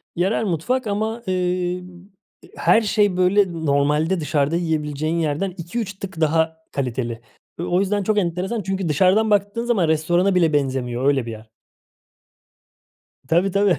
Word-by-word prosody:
yerel 190 +6 +1
mutfak 220 +8 -1
ama, 220 +3 -2
emm, 180 0 -1 0.7
her 225 - +4
şey 205 -3 +1
böyle 185 0 +3
normalde 150 +5 +2
dışarıda 150 +1 0
yiyebileceğin 155 -1 -1
yerden 160 +4 -1
2-3 200 +5 -4
tık 185 -4 -7
daha 160 +1 +2
kaliteli. 120 -3 -3 0.4
O - - -2
o - - +4
yüzden 200 +1 0
çok 215 +2 0
enteresan 185 +4 -1
çünkü 190 -3 -2
dışarıdan 190 +8 +3
baktığın 205 +4 +1
zaman 205 -9 +2
restorana 175 +5 +2
bile 165 -4 +3
benzemiyor 130 -3 -1
öyle 135 -4 +2
bir 115 - -5
yer. 110 0 -11 1.8
Tabii 175 +4 +2
tabii. 200 -1 +3
180 Hz, 140 wpm, -21 LUFS, 150-200 Hz, 1.8 s, her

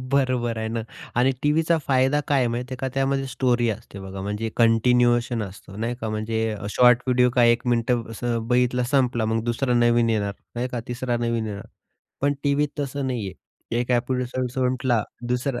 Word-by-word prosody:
बरोबर 130 -4 +1
आहे 110 0 -2
ना. 115 +1 -2 0.4
आणि 125 +2 +4
टीव्हीचा 160 +3 +3
फायदा 135 +2 +3
काय 145 - +3
आहे 125 - +2
माहिती 125 +2 -4
आहे - - -8
का, 135 - -1
त्यामध्ये 135 0 0
स्टोरी 125 -2 +1
असते 110 -2 -7
बघा, 95 0 -7
म्हणजे 105 +3 -3
कंटिन्युएशन 120 +1 +3
असतो 95 -1 -9
नाही 115 +3 -2
का. 110 - -3
म्हणजे 110 +1 -1 0.2
शॉर्ट 125 +2 +5
व्हिडिओ 125 -1 +3
का 125 -3 +5
एक 120 +2 +3
मिनिट 120 0 +2 0.2
असं 115 0 -2
बघितला, 125 0 +2
संपला 125 -5 +2
मग 110 +1 0
दुसरा 120 +2 0
नवीन 120 -1 +3
येणार 100 -2 0 0.2
नाही 120 +2 -2
क?. - - -4
तिसरा 120 0 -2
नवीन 115 -1 -1
येणार. 105 +1 -6 0.5
पण 145 +1 +2
टीव्हीत 145 +1 +2
तसं 140 -1 -2
नाहीये 115 -7 -3 0.5
एक 125 - -3
एपिसोड 125 +1 0
संपला 125 -2 +1 0.3
दुसरा 125 +1 -1
120 Hz, 175 wpm, -24 LUFS, 115-130 Hz, 0.5 s, शॉर्ट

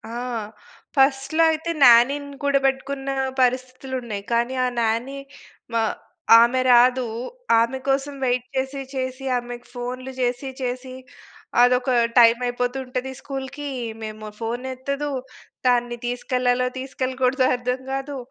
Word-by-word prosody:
ఆ! - - -3 0.8
ఫస్ట్‌లో 275 +4 +3
అయితే 320 +2 -2
న్యానీని 275 +4 +5
కూడా 280 -1 +3
పెట్టుకున్న 270 0 -1 0.3
పరిస్థితులు 255 +1 -1
ఉన్నాయి. 210 -4 -5
కానీ 235 +2 +1
ఆ - - +2
నాని 230 +5 -1 0.6
మా 230 - +2 0.6
ఆమె 240 +2 +3
రాదు. 250 0 +5 0.5
ఆమె 235 +3 +1
కోసం 275 +1 0
వెయిట్ 245 0 0
చేసి 265 +1 -2
చేసి, 260 +1 -4
ఆమెకి 245 0 -7
ఫోన్లు 250 +2 -5
చేసి 250 +2 -1
చేసి 255 +1 -4 0.7
అదొక 250 +1 +4 0.3
టైమైపోతుంటది 250 +2 +2
స్కూల్‌కి. 275 +1 -6 0.2
ఇమేమో 215 -1 -7
ఫోనెత్తదు. 260 +5 -3 0.6
దాన్ని 240 -1 +2
తీసుకెళ్ళాలో, 250 0 0
తీసుకెళ్ళకూడదో 260 0 0
అర్థం 250 +1 -2
కాదు. 270 +1 -4
255 Hz, 110 wpm, -23 LUFS, 245-270 Hz, 0.8 s, న్యానీని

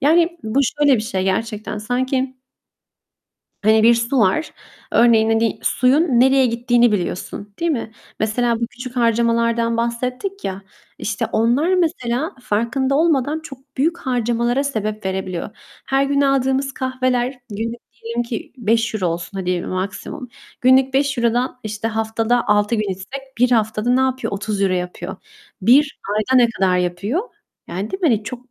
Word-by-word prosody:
Yani, 335 +4 +3
bu 220 +5 +1
şöyle 285 +1 +3
bir - - -1
şey 190 -4 -2
gerçekten; 210 +2 -2
sanki 255 +3 -1 1.3
hani, 220 +1 +4
bir 235 +1 +7
su 235 +3 0
var. 225 +9 +2 0.4
Örneğin, 225 -2 +5
hani, 225 0 +1
suyun 260 +5 +3 0.2
nereye 265 0 +5
gittiğini 240 0 +2
biliyorsun, 200 +2 -4
değil 335 0 +1
mi? 230 -5 -3 0.3
Mesela 230 +2 +1
bu 235 - 0
küçük 250 +2 -9
harcamalardan 230 0 +2
bahsettik 250 - -3
ya, 195 +1 -4 0.4
işte, 205 -1 -2
onlar 255 +11 +2
mesela 315 -3 0
farkında 245 +6 0
olmadan 300 -1 +2
çok 270 -3 -13
büyük 325 +6 +1
harcamalara 240 +1 0
sebep 215 -6 -3
verebiliyor. 190 -1 -3 0.4
Her 270 +1 +2
gün 280 0 +1
aldığımız 275 0 +1
kahveler 255 -1 -1 0.2
günlük 230 +3 -4 0.2
diyelim 235 +1 -2
ki 235 -1 -6
€5 225 -4 0
olsun 170 +3 -4
hadi 180 -1 -1
maksimum. 195 +7 -5 0.3
Günlük 260 +1 +4
€5'dan, 255 -2 +1
işte, 215 +1 -3
haftada 225 +2 0
6 210 +2 +3
gün 215 -3 -1
içsek 265 +8 -9
1 250 0 +4
haftada 220 0 +1
ne 255 +1 +4
yapıyor? 260 -4 -1
€30 200 -1 -1
yapıyor. 180 0 -4 0.5
1 275 +7 +4 0.2
ayda 255 +5 +2
ne 235 - +4
kadar 190 -4 +1
yapıyor? 180 - -1 0.5
Yani, 195 +4 -4
değil 380 - -4
mi, 340 - +3
hani, 220 -5 +1
çok 245 +3 -8
235 Hz, 145 wpm, -20 LUFS, 215-265 Hz, 1.3 s, bir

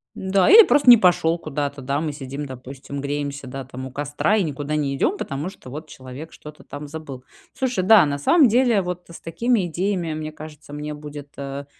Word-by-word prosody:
Да 190 0 +2
или 450 +2 +10
просто 280 -3 +4
не 240 - +11
пошёл 175 -3 +3
куда-то, 145 -3 -4
да. 140 +2 -1
Мы 155 -2 -2
сидим, 140 +1 -6
допустим, 135 +2 -8
греемся, 140 -1 -4
да, 135 +1 -6
там, 130 0 -8
у 130 - -8
костра 145 +9 0
и 210 - +2
никуда 150 -1 -3
не 140 -2 -1
идём, 365 - 0
потому 145 - -4
что 130 - -13
вот 155 +4 -8
человек 130 +5 -10
что-то 150 0 -12
там 145 +1 -8
забыл. 145 -4 -8 0.3
Слушай, 250 -8 -1
да, 210 -2 +7
на 140 -1 -2
самом 275 - +5
деле 235 -2 +3
вот 180 -1 -5
с 170 - -11
такими 200 +4 0
идеями, 175 -1 -2
мне 155 0 -5
кажется, 155 -1 -12
мне 150 +1 -5
будет, 145 -1 -9
э, 140 0 -6
150 Hz, 205 wpm, -22 LUFS, 140-180 Hz, 0.3 s, не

